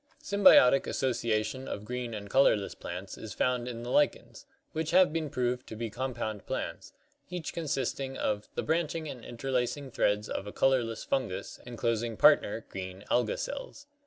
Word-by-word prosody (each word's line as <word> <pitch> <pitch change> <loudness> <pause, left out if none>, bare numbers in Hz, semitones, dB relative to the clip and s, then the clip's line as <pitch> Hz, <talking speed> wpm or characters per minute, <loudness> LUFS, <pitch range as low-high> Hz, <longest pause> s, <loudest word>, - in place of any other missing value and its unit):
Symbiotic 190 -10 +6
association 120 0 -1
of 105 - -5
green 125 -1 -4
and 100 -1 -6
colorless 105 -4 +3
plants 90 +2 -7
is 110 - -7
found 125 -1 0
in 120 -1 -5
the 120 - -4
lichens, 295 +12 +1 0.2
which 160 -1 -2
have 180 -3 +5
been 160 -2 -1
proved 125 -1 -1
to - - -7
be 115 0 -4
compound 115 -4 -4
plants, - - -4 0.4
each 175 -3 -5
consisting 135 -4 -2
of 105 -1 -1
" - - -39
the - - -1
branching 160 0 -1
and 125 -5 -7
interlacing 130 +2 -2
threads 105 -1 +1
of 100 - -4
a - - -5
[colorless] 120 -4 +1
Fungus 100 -8 -2
enclosing 115 -1 -1
partner - - +4
[green] 95 +1 -7
Alga 120 -3 +2
cells. 280 0 -6
125 Hz, 160 wpm, -30 LUFS, 110-140 Hz, 0.4 s, Symbiotic